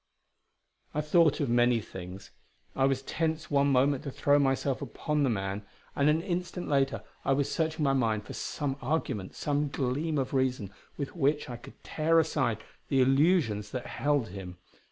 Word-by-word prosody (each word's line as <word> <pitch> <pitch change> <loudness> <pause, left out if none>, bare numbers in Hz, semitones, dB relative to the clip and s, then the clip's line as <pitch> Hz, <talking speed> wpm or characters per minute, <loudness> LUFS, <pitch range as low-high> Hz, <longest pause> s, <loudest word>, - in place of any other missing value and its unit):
I 150 - +1
thought 155 0 +3
of 145 - 0
many 120 0 +3
things. 95 -2 -9 0.4
I 135 - +3
was 135 -1 +1
tensed 160 +1 -2
one 140 0 +3
moment 135 +1 +3
to 145 - -4
throw 145 +2 +3
myself 135 -1 +1
upon 150 -1 -2
the 140 - +3
man; 95 -2 -2 0.3
and 140 +1 +3
an 160 +2 +2
instant 180 -1 -3
later 135 -1 +1 0.2
I 135 - +2
was 140 0 0
searching 160 -1 -1
my 135 -1 +3
mind 110 -5 0
for - - -8
some 140 -2 -3
argument, 130 -8 -2
some 145 0 0
gleam 140 +4 -1
of 135 0 -1
reason, 130 -7 0 0.2
with 140 +2 -5
which 145 -3 +1
I 120 - -5
could 120 - -15
tear 165 +1 +1
aside 130 -8 0 0.2
the 135 - +2
illusions 135 - +3
that 125 - -3
held 145 -5 0
him. 90 -2 -8
135 Hz, 175 wpm, -29 LUFS, 125-150 Hz, 0.4 s, thought